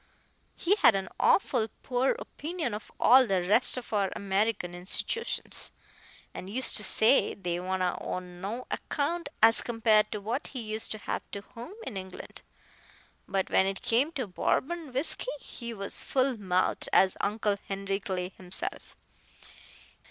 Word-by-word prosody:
He 355 - +2
had 235 - +6
an 195 -1 -2
awful 245 - +3 0.2
poor 255 +1 +1
opinion 315 -6 -4
of 210 0 -7
all 255 0 +7
the 190 -3 +1
rest 230 +6 +5
of 245 -2 -7
our 200 -2 +1
American 200 -2 -1
institootions, 185 - -2 0.6
and 185 - -7
used 255 +5 +3
to 210 - +2
say 225 +6 +5
they 175 -3 -3
wa'n't 185 +1 -2
o' 180 0 -2
no 185 +7 -6
account 315 +2 -2
as 225 0 +7
compared 225 -2 +2
to 210 - -3
what 230 +7 -3
he 260 - -7
used 220 -1 -4
to - - -6
have - - -3
to 200 - -5
home 235 - -11
in 210 - -5
England; 190 -1 -9 0.9
but 195 -1 -1
when 190 - +4
it 195 -1 -4
come 255 +7 +2
to 265 -6 -2
Bourbon 300 - -1
whisky, 285 - -2
he 235 -3 -7
was 200 -3 -1
as - - -3
full 260 -1 +1
mouthed 185 -4 0
as 190 -1 +5
Uncle 210 -1 0
Henry 195 0 -2
Clay 185 -2 -3
himself. 185 -1 -7
215 Hz, 155 wpm, -29 LUFS, 190-255 Hz, 0.9 s, all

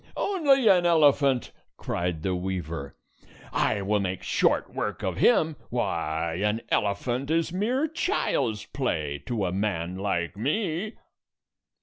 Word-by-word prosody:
"Only 285 - +3
an 185 -3 +6
elephant!" 145 -6 +3 0.3
cried 85 -3 -3
the 95 - 0
weaver. 85 -6 -4 0.6
"I 100 -2 +1
will 105 +2 +1
make 95 -2 -3
short - - +1
work - - -3
of 95 -2 -2
him. 160 - +3
Why, 85 -7 -1
an 105 +2 +1
elephant 120 +7 0
is 165 +1 +1
mere 245 +10 +1
child's 310 - -1
play 75 - -2
to 110 -5 -1
a 90 - -1
man 90 -3 -2
like 90 -4 -1
me!" 175 - -1
110 Hz, 125 wpm, -26 LUFS, -, 0.6 s, an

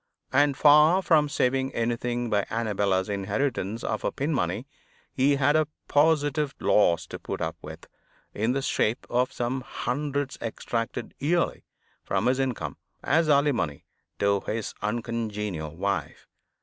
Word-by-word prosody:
And, 140 0 +3
far 155 +5 +6
from 150 -4 +4
saving 135 -1 0
anything 120 +1 -1
by 100 -1 +1
Annabella's 100 -4 0
inheritance 105 +2 -2
of - - -2
her - - 0
pin 145 +4 -2
money, 135 - -1 0.5
he 140 +2 +3
had 140 +2 +3
a 155 -1 +3 0.2
positive 150 -1 +2
loss 85 -5 +3
to - - -8
put - - -5
up - - -2
with, - - -10 0.5
in 110 +4 0
the 135 0 -1
shape 115 -3 0
of 125 +1 +1
some 125 +2 -2
hundreds 140 +2 -3
extracted 115 +1 -3
yearly 165 +5 0 0.4
from - - -1
his 130 +2 +2
income, 115 - -2 0.3
as 160 +1 +2
alimony 140 - +1 0.3
to 100 0 +2
his 110 -1 -3
uncongenial 105 -7 -3
wife. 95 -5 -3
125 Hz, 135 wpm, -26 LUFS, 105-145 Hz, 0.5 s, far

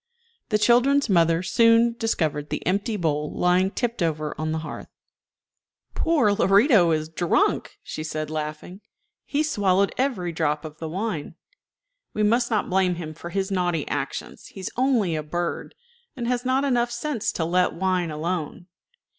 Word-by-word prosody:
The 210 - +3
children's 245 +5 +3
mother 165 -1 +3
soon 230 +3 +4
discovered 160 -11 -1
the - - -4
empty 200 +4 0
bowl 150 -4 -1
lying 180 +2 +3
tipped 235 0 -3
over 155 -2 -1
on 155 0 -3
the 160 - -1
hearth. - - -7 1.1
"Poor 300 -11 +2
Lorito 200 - +4
is 155 -1 0
drunk," 165 +1 0
she 155 - -6
said, 155 -1 -4
laughing; 155 +5 -5 0.4
"he 290 - 0
has 310 - -1
swallowed 195 -1 +2
every 225 -11 0
drop 155 -2 -1
of 155 0 -9
the 160 - -5
wine. 185 -3 -4 0.8
We 215 - +1
must 235 +3 +2
not 215 -3 0
blame 185 -1 +2
him 160 -2 -6
for 170 +2 -9
his 195 +2 -2
naughty 175 -5 0
actions. 140 -1 -5
He 195 - -11
is 185 - -4
only 240 -9 +2
a 155 - -2
bird, 170 +3 -4 0.4
and 240 -3 -4
has 245 0 0
not 260 +2 +2
enough 245 -3 +1
sense 240 0 -2
to 160 - -1
let 180 +2 +2
wine 185 -1 0
alone." 165 +2 -4
185 Hz, 165 wpm, -24 LUFS, 160-230 Hz, 1.1 s, soon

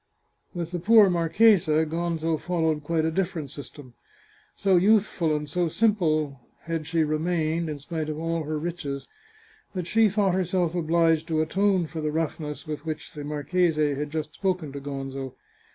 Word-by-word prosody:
With 170 -1 -4
the 175 - -2
poor 210 +1 +6
marchesa 165 -2 +4
Gonzo 165 0 -1
followed 160 -4 0
quite 160 +1 0
a 160 - +1
diflferent 165 -5 -2
system. 145 -3 -10 0.6
So 195 -2 +2
youthful 185 -4 +3
and 150 0 -3
so 175 +4 0
simple 155 - +1 0.2
had 165 -2 -4
she 165 0 +2
remained, 160 +1 0
in 150 - -4
spite 155 +2 -4
of 150 - -3
all 165 0 -1
her 155 0 -3
riches, 150 -4 -4 0.7
that 180 -2 -2
she 220 +3 +4
thought 200 -2 +1
herself 180 -2 0
obliged 165 -1 +2
to 155 -2 +1
atone 190 +2 +1
for 160 0 -6
the 155 0 -1
roughness 150 -2 -3
with 150 -1 -5
which 155 -1 -5
the 150 - -7
mar 145 0 -4
chese 175 +2 +2
had 150 -1 0
just 155 0 -4
spoken 180 -7 -2
to 140 - -6
Gonzo. 135 -1 -5
160 Hz, 170 wpm, -26 LUFS, 150-175 Hz, 0.7 s, poor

